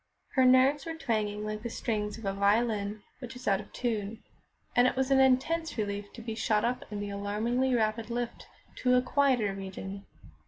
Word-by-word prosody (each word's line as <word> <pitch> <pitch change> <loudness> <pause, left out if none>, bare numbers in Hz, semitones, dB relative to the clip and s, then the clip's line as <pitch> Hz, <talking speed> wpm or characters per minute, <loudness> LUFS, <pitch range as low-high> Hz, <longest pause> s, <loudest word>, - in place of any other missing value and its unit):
Her 260 -1 +4
nerves 265 +4 +5
were 325 - -3
twanging 210 -6 -1
like 215 0 -4
the 235 - -4
strings 210 -2 -2
of 225 - -9
a 195 - 0
violin 205 0 +1 0.2
which 250 -1 -8
is 250 - -10
out 195 -2 +3
of - - -15
tune, 220 -3 -3 0.5
and 245 +1 +6
it - - 0
was 265 +1 0
an 270 - +5
intense 265 +5 +2
relief 205 -1 -3
to 230 - -9
be 225 -1 -4
shot 220 -1 +1
up 245 +1 -1
in 205 - -4
the 205 0 -4
alarmingly 225 +6 0
rapid 220 0 0
lift 240 0 -4 0.3
to 250 0 +3
a 250 - +5
quieter 255 -7 +2
region. 195 0 -7
225 Hz, 195 wpm, -30 LUFS, 205-255 Hz, 0.5 s, and